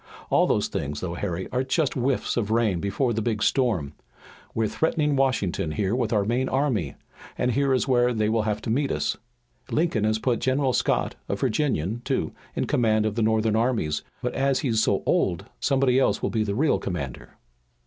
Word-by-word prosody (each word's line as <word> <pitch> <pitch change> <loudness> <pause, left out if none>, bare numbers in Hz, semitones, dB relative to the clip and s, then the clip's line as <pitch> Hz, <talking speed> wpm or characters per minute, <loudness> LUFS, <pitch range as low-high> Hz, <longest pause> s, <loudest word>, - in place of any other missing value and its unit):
All - - +4
those - - +1
things, 75 +1 -4
though, 85 0 -4
Harry, 90 0 -3
are 125 0 +1
just 135 +2 0
whiffs 130 +1 0
of 110 -4 -1
rain 110 -5 +2
before 100 +7 0
the 110 - -1
big 110 -1 -1
storm. 105 - +1 0.6
We're 110 -1 +1
threatening 150 +2 0
Washington 100 - 0
here 100 +3 0
with 120 -4 -1
our 105 -3 +2
main 125 +4 0
army, 130 - 0 0.4
and 125 - +1
here 140 +2 +1
is 130 +1 +1
where 125 -1 +3
they 110 -3 0
will 110 +1 +2
have 105 0 -2
to - - -2
meet 140 +4 +1
us. - - -1 0.5
Lincoln 155 -10 +1
has 110 0 +2
put 120 +1 0
General 130 0 +1
Scott, - - 0
a - - 0
Virginian, 120 - -1
too, - - -1 0.2
in - - 0
command 110 -3 +2
of 110 - 0
the 115 - -1
Northern 110 0 +2
armies, 110 - 0 0.2
but 125 - -1
as 135 -1 +1
he's 115 -7 +1
so - - +1
old, - - +1
somebody 135 -2 +2
else 135 - +1
will - - 0
be 110 -2 +1
the 100 -1 -2
real 150 +6 +2
commander." 80 -9 -6
115 Hz, 195 wpm, -25 LUFS, 105-130 Hz, 0.6 s, All